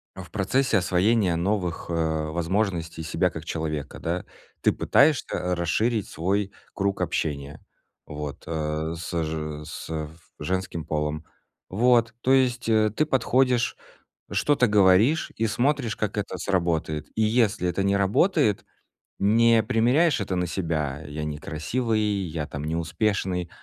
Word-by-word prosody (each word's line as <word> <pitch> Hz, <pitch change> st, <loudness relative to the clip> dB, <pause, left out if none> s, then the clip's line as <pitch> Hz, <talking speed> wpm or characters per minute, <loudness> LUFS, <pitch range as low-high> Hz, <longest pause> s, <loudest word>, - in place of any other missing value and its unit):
а, 95 Hz, -, -7 dB
в 85 Hz, -, -15 dB
процессе 115 Hz, +4 st, +1 dB
освоения 95 Hz, +1 st, +2 dB
новых, 90 Hz, 0 st, -1 dB
э, -, -, -2 dB, 0.4 s
возможностей 85 Hz, -1 st, -1 dB
себя 80 Hz, -, +1 dB
как -, -, -8 dB
человека, 75 Hz, -3 st, -4 dB
да. 85 Hz, +2 st, -3 dB, 0.4 s
Ты -, -, +4 dB
пытаешься 135 Hz, -, +2 dB
расширить 105 Hz, +6 st, 0 dB
свой 100 Hz, +4 st, -1 dB, 0.2 s
круг 100 Hz, 0 st, -1 dB
общения 70 Hz, -1 st, -2 dB, 0.4 s
вот, 75 Hz, -2 st, -7 dB
э, 80 Hz, 0 st, -2 dB
с 85 Hz, 0 st, -2 dB
же 75 Hz, -1 st, -4 dB
с -, -, -8 dB
в 80 Hz, 0 st, -7 dB
женским 90 Hz, -1 st, -2 dB
полом. 75 Hz, +1 st, -2 dB, 0.4 s
Вот. 115 Hz, +2 st, +3 dB
То 130 Hz, -, +1 dB
есть, 125 Hz, -3 st, +2 dB
э, 110 Hz, -1 st, +4 dB
ты 155 Hz, -, +2 dB
подходишь, 130 Hz, -3 st, +2 dB, 0.6 s
что-то 145 Hz, -4 st, +2 dB
говоришь 105 Hz, -, +4 dB
и 115 Hz, -, +1 dB
смотришь, 120 Hz, +1 st, 0 dB
как 105 Hz, 0 st, -2 dB
это 100 Hz, -2 st, -3 dB
сработает. 85 Hz, -5 st, -1 dB
И 110 Hz, -, +1 dB
если 110 Hz, -4 st, +2 dB
это 90 Hz, +3 st, 0 dB
не 100 Hz, 0 st, +2 dB
работает, 105 Hz, -, +2 dB, 0.6 s
не 115 Hz, +3 st, +4 dB
примеряешь 130 Hz, +8 st, +3 dB
это 95 Hz, -1 st, -2 dB
на 90 Hz, 0 st, 0 dB
себя: 80 Hz, -5 st, -2 dB
"Я 75 Hz, +1 st, -5 dB
некрасивый, 80 Hz, +10 st, -2 dB
я 95 Hz, -8 st, -2 dB
там 75 Hz, -1 st, -6 dB
не 80 Hz, +2 st, -2 dB
успешный", 90 Hz, +1 st, -1 dB
95 Hz, 135 wpm, -25 LUFS, 80-115 Hz, 0.6 s, Ты